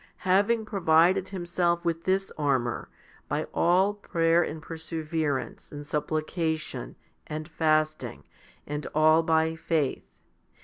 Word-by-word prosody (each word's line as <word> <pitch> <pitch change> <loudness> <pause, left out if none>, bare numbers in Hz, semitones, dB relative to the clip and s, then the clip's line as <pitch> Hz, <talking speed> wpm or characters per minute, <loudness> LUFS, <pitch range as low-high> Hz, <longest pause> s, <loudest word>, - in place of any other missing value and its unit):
Having 205 +4 +3
provided 180 -2 +3
himself 175 -2 -1
with 165 0 -1
this 195 +1 +1
armour 135 -5 -1 0.4
by - - -1
all 185 +4 +3
prayer 170 -4 +2
and 160 -1 -3
perseverance 160 -3 -3
and 145 0 -7
supplication 155 +2 -2 0.3
and 155 0 -5
fasting, 155 - 0 0.4
and 150 0 -4
all 155 +1 +5
by 160 0 +2
faith 160 -3 -2
160 Hz, 105 wpm, -27 LUFS, 155-175 Hz, 0.4 s, all